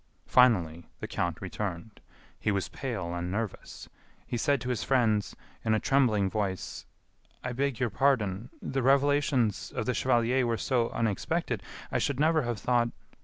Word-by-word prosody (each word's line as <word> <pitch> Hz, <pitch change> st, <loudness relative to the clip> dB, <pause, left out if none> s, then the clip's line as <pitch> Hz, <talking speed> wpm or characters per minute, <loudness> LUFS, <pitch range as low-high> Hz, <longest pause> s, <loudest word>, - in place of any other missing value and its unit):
Finally, 90 Hz, -10 st, +3 dB
the -, -, -5 dB
count 85 Hz, -2 st, -2 dB
returned. 100 Hz, +1 st, -5 dB, 0.4 s
He -, -, 0 dB
was 100 Hz, -1 st, -1 dB
pale 105 Hz, -11 st, -4 dB
and 90 Hz, +1 st, -3 dB
nervous. 105 Hz, 0 st, -5 dB, 0.4 s
He -, -, -4 dB
said 140 Hz, +4 st, +2 dB
to 125 Hz, -, -4 dB
his 125 Hz, -4 st, -1 dB
friends, 115 Hz, -6 st, +2 dB, 0.3 s
in 110 Hz, -1 st, +2 dB
a -, -, +2 dB
trembling 115 Hz, -8 st, +3 dB
voice: 95 Hz, -2 st, -3 dB, 0.6 s
"I 125 Hz, -, -2 dB
beg 135 Hz, -1 st, -1 dB
your 125 Hz, -3 st, 0 dB
pardon.... 115 Hz, -4 st, +1 dB
the 135 Hz, 0 st, -1 dB
revelations 140 Hz, -4 st, +2 dB
of -, -, -3 dB
the 125 Hz, -, +1 dB
chevalier 125 Hz, +1 st, +2 dB
were 115 Hz, -1 st, 0 dB
so 120 Hz, -3 st, +1 dB
unexpected....I 110 Hz, -4 st, -2 dB
should 140 Hz, -2 st, -1 dB
never 160 Hz, +1 st, +4 dB
have 120 Hz, -3 st, -2 dB
thought...." 120 Hz, -1 st, +2 dB
115 Hz, 155 wpm, -29 LUFS, 100-130 Hz, 0.6 s, never